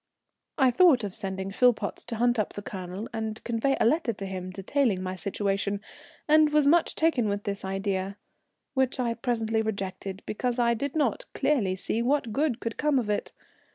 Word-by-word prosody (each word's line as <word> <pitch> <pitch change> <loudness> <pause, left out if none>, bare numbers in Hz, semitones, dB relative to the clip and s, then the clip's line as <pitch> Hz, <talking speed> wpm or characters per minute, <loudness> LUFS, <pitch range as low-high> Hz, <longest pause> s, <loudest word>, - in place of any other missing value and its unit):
I 265 -4 +5
thought 270 -3 +5
of 200 -3 -4
sending 190 -2 -4
Philpotts 245 +2 +2
to 235 - -5
hunt 240 +1 +2
up 210 - -1
the 205 - -7
Colonel 190 +2 -6
and 220 -1 -4
convey 240 +4 0
a - - +3
letter 295 +1 +2
to 195 -1 -6
him 185 -1 -5
detailing 195 +1 0
my 185 0 -3
situation, 200 +1 -1 0.5
and 310 0 +6
was 300 -1 +3
much 330 +4 +4
taken 275 -9 +2
with 205 0 -2
this 200 0 -3
idea, 195 0 -2 0.6
which 265 -1 +1
I 235 -2 +1
presently 225 -2 0
rejected 195 -2 -4
because 245 +3 -2
I 235 -1 +3
did 275 +5 -3
not 315 +11 0
clearly 210 -11 +1
see 215 +4 -2
what 245 -2 +1
good 275 -2 +1
could 230 -1 -4
come 300 -2 +2
of 225 -5 0
it. 205 - -2
225 Hz, 185 wpm, -27 LUFS, 195-260 Hz, 0.6 s, and